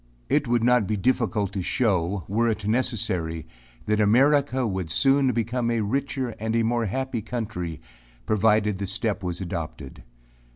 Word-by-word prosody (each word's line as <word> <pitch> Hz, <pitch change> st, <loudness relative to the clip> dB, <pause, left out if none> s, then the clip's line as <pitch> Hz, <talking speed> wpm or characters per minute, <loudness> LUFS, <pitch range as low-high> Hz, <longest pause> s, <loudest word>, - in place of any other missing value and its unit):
It 145 Hz, -2 st, +2 dB
would 120 Hz, -1 st, +2 dB
not 125 Hz, -4 st, +4 dB
be 110 Hz, -, 0 dB
difficult 110 Hz, -3 st, 0 dB
to 100 Hz, -, -2 dB
show, 95 Hz, -3 st, 0 dB
were 115 Hz, +4 st, +1 dB
it 110 Hz, -2 st, -1 dB
necessary, 95 Hz, -9 st, -1 dB, 0.4 s
that 105 Hz, 0 st, +1 dB
America 130 Hz, +4 st, +3 dB
would 95 Hz, -6 st, -2 dB
soon 135 Hz, -, +3 dB
become 120 Hz, +1 st, -1 dB
a 115 Hz, -1 st, +1 dB
richer 130 Hz, +3 st, -1 dB
and 110 Hz, +2 st, 0 dB
more 115 Hz, -1 st, +1 dB
happy 130 Hz, +2 st, -2 dB
country, 105 Hz, -8 st, -4 dB, 0.5 s
provided 105 Hz, -1 st, +2 dB
the 100 Hz, -, -3 dB
step 105 Hz, +1 st, -2 dB
was 90 Hz, 0 st, -4 dB
adopted. 80 Hz, -6 st, -6 dB
110 Hz, 150 wpm, -25 LUFS, 100-125 Hz, 0.5 s, not